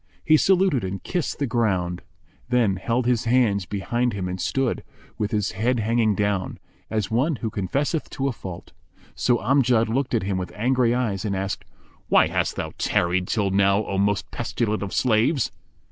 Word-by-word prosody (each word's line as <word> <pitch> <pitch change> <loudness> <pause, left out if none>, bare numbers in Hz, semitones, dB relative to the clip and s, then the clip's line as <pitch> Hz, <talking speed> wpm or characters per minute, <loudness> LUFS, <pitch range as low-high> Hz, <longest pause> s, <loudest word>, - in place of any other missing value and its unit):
He 155 - +6
saluted 185 - +3
and 95 +1 -4
kissed 175 -4 -2
the 145 - 0
ground; 95 -8 0 0.5
then 115 -6 +2
held 115 +6 -1
his 120 -1 +1
hands 115 -6 +2
behind 120 +5 -1
him 95 -2 -3
and 90 0 -4
stood, 130 +7 -1 0.4
with 105 - 0
his 105 -2 0
head 115 +4 0
hanging 110 -1 +2
down, 100 -2 -1 0.3
as 110 -2 -2
one 135 +8 +2
who 115 -3 -4
confesseth 135 - -1
to 135 -1 -2
a - - +1
fault. 95 -6 -9 0.4
So 120 -1 +2
Amjad 120 -1 +2
looked 130 +2 0
at 110 - +1
him 95 -1 -1
with 90 -2 -5
angry 120 +2 +2
eyes 110 -7 -1
and 100 -3 -1
asked, 95 +1 -3 0.4
"Why - - +6
hast - - -1
thou - - -4
tarried 90 +1 +1
till 100 -4 0
now, 100 +2 +3
O 95 - -2
most 100 0 0
pestilent 115 -2 -2
of 100 -2 -4
slaves?" 125 +2 +2
110 Hz, 175 wpm, -24 LUFS, 100-125 Hz, 0.5 s, He